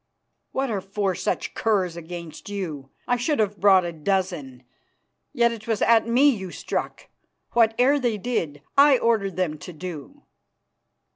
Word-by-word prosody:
"What 265 -2 -1
are 200 -3 -2
four 195 0 -1
such - - -2
curs 190 -6 0
against 170 0 -8
you? 160 -9 -5 0.2
I 245 -1 +2
should 290 +5 0
have 210 -2 0
brought 190 -2 +5
a 170 - -3
dozen. 160 -6 -2 0.7
Yet 235 -4 +3
it 225 -1 -8
was 225 -3 0
at 230 -1 +4
me 250 +5 +4
you 190 -7 -5
struck. - - -4 0.4
Whate'er 240 +5 +3
they 240 -5 0
did 165 -10 -3
I 280 -1 +7
ordered 215 -6 +1
them 165 -5 -2
to 180 - -9
do." 180 - -8
200 Hz, 150 wpm, -24 LUFS, 175-235 Hz, 0.7 s, I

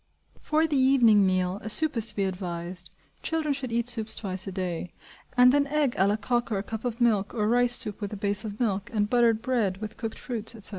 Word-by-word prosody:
For 310 +1 +1
the 295 -4 0
evening 235 -7 +4
meal, 185 +1 -1
a 220 - -7
soup 310 +6 +3
is 225 -1 +3
to - - 0
be 200 - -1
advised 180 -2 -5 0.3
(children 315 -2 -2
should 265 -3 -6
eat 235 0 -1
soups 225 -3 +2
twice 190 -2 -2
a - - -4
day), 180 -2 -5 0.4
and 250 +1 +6
an 285 0 +2
egg 295 -2 0
à 190 -4 +1
la 205 - +1
coque 240 +3 -2
or 205 - 0
a 195 - -3
cup 220 +2 -7
of 240 -1 -4
milk; 215 -4 +1
or 210 -2 0
rice 245 +1 +5
soup 220 -4 -1
with 205 - -5
a 210 - -6
base 200 +1 +3
of 210 -1 -7
milk, 200 -5 -2
and 210 -2 -1
buttered 235 -2 +2
bread, 225 -8 -1
with 215 +1 -8
cooked 225 -1 -6
fruits, 230 -2 -3
etc. 215 - 0
220 Hz, 240 wpm, -26 LUFS, 195-245 Hz, 0.4 s, and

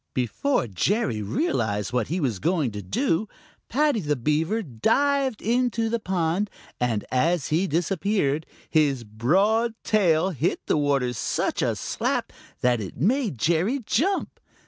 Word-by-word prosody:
Before 130 - 0
Jerry 115 - 0
realized 110 - -1
what 125 -3 +1
he 175 +4 -1
was 125 - -1
going 160 - +1
to 105 0 -6
do, 170 - 0 0.4
Paddy 290 -1 +2
the 150 -5 0
Beaver 160 - 0
dived 265 - +1
into 235 -1 +1
the 235 - 0
pond, 185 0 0 0.3
and 115 -4 0
as 160 +4 +1
he 170 +5 +1
disappeared, 170 -2 0 0.2
his 145 -6 +2
broad 195 - +1
tail 185 -4 +3
hit 165 +1 -1
the - - +1
water 140 -4 +1
such 115 - -1
a - - +1
slap - - -2 0.3
that 125 -2 +2
it 95 - -7
made 215 - +1
Jerry 170 - +1
jump. 380 - 0
165 Hz, 140 wpm, -25 LUFS, -, 0.4 s, tail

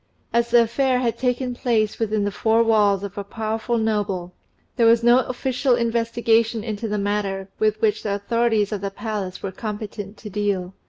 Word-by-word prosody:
As 235 0 +2
the 235 0 +6
affair 255 +3 +1
had 240 -2 0
taken 250 0 0
place 225 -4 0
within 215 -2 0
the 205 - -1
four 225 +3 +2
walls 205 -3 +3
of 200 +1 -6
a - - -3
powerful 220 +3 -2
noble, 205 -5 -1 0.4
there 235 -3 +4
was 230 0 +5
no 240 +1 +6
official 255 0 0
investigation 230 -1 +1
into 220 0 -4
the 210 0 -1
matter, 200 -1 -2
with 215 0 +1
which 215 -1 +2
the 200 -2 -1
authorities 220 0 +1
of 205 -3 -3
the 200 - -2
palace 195 -3 -5
were 195 - -3
competent 210 0 -6
to 215 - -9
deal. 195 -2 -1
220 Hz, 180 wpm, -22 LUFS, 205-235 Hz, 0.4 s, the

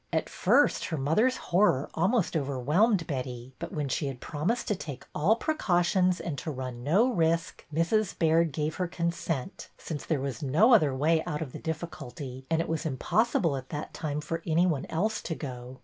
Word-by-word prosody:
At - - 0
first - - +3
her 160 - -3
mother's 210 - +2
horror 175 -7 +2
almost 190 +3 +1
overwhelmed 155 - +2
Betty, 125 -3 -5
but - - -5
when 150 -2 -2
she 140 +2 -1
had 135 -3 -5
promised 165 - -2
to 210 - +2
take 140 -7 -7
all 175 +9 +3
precautions, 185 - +1
and 150 -5 -4
to - - -5
run 130 -4 -5
no 205 - +3
risk, 165 -2 0
Mrs. 175 +6 +1
Baird 165 0 +3
gave 150 +2 -2
her 180 - 0
consent, 170 -3 -3
since 150 -3 -6
there 155 -4 0
was 135 -4 -4
no 160 - +4
other 150 - +5
way 160 +4 +2
out 150 +1 -2
of 140 - -9
the - - -8
difficulty, 140 -5 -6
and 165 0 +2
it - - -3
was 165 0 -2
impossible 165 - +1
at 130 -1 -7
that 150 0 -5
time 150 -1 -3
for 165 +2 -4
any 170 +2 +3
one 155 -7 0
else 210 +7 -1
to 165 - -4
go. 125 -3 -7
160 Hz, 190 wpm, -28 LUFS, 140-175 Hz, -, other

